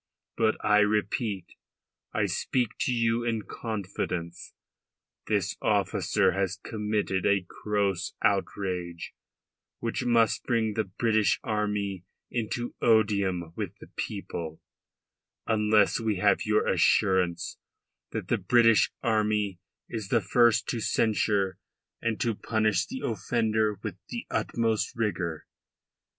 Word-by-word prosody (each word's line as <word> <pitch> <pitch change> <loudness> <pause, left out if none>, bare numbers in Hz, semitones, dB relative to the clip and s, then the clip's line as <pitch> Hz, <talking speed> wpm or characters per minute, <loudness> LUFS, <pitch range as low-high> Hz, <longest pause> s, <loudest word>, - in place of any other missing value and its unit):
But 110 -1 +2
I 105 0 +5
repeat, 105 -2 0 0.6
I - - +1
speak 125 -4 0
to - - +1
you 115 -1 +1
in 115 -2 -1
confidence. 90 -6 -5 0.7
This - - 0
officer - - +2
has 95 -1 -1
committed 105 -3 -1
a 100 -2 +2
gross 100 -3 -1
outrage, 90 -3 -1 0.6
which 115 +3 -2
must 115 -2 +3
bring 115 -3 +1
the 110 0 0
British 110 +2 +1
army 105 -4 -1 0.3
into 120 +1 -2
odium 100 -7 +2
with - - -5
the - - -14
people, 80 -2 -5 0.9
unless 105 -1 +3
we 110 -2 0
have 100 +2 +2
your 105 0 +3
assurance 90 -3 +2 0.5
that - - -4
the - - +1
British 115 -2 +4
army 105 -4 +1 0.3
is 110 -3 -5
the 120 - +4
first 115 +3 +3
to 120 - -1
censure 105 -3 +1 0.4
and 115 -2 -1
to 115 - +1
punish 110 -3 0
the 260 0 -6
offender 110 0 0
with - - -4
the - - -5
utmost 115 -2 0
rigour. 90 -8 -2
105 Hz, 115 wpm, -28 LUFS, 95-115 Hz, 0.9 s, I